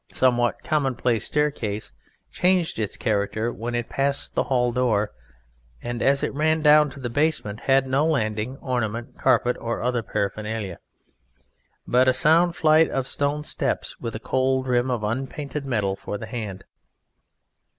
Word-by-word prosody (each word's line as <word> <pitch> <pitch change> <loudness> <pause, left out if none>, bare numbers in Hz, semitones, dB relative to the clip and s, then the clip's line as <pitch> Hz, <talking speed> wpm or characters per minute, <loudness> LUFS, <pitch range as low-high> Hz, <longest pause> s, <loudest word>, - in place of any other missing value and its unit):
somewhat 120 -2 +1
commonplace 130 -6 0
staircase 120 -9 -1 0.4
changed 180 -7 +2
its 105 -3 -3
character 110 +1 -1
when 120 +1 -4
it 120 -1 -2
passed 140 +1 -1
the - - 0
hall 125 -2 +1
door, 110 -4 +1 0.7
and 120 0 -5
as 140 0 +2
it - - -1
ran 155 +2 +1
down 150 0 +6
to 140 - -12
the 125 - -3
basement 120 -5 0
had 135 -1 +3
no 135 +3 +2
landing, 115 -5 -1
ornament, 120 -2 -3
carpet 125 -1 +3
or 115 0 -3
other 125 -1 0
paraphernalia, 105 -2 -3 1.1
but 125 +1 +3
a 130 - +5
sound 165 +6 +4
flight 160 0 +4
of 135 -1 -2
stone 145 +1 -1
steps - - -2
with 115 -1 -5
a - - -4
cold 130 +1 0
rim 125 0 +1
of 120 -4 -1
unpainted 135 +5 -4
metal 105 -6 0
for 105 - -6
the - - -7
hand. 105 -6 -5
125 Hz, 150 wpm, -24 LUFS, 110-140 Hz, 1.1 s, down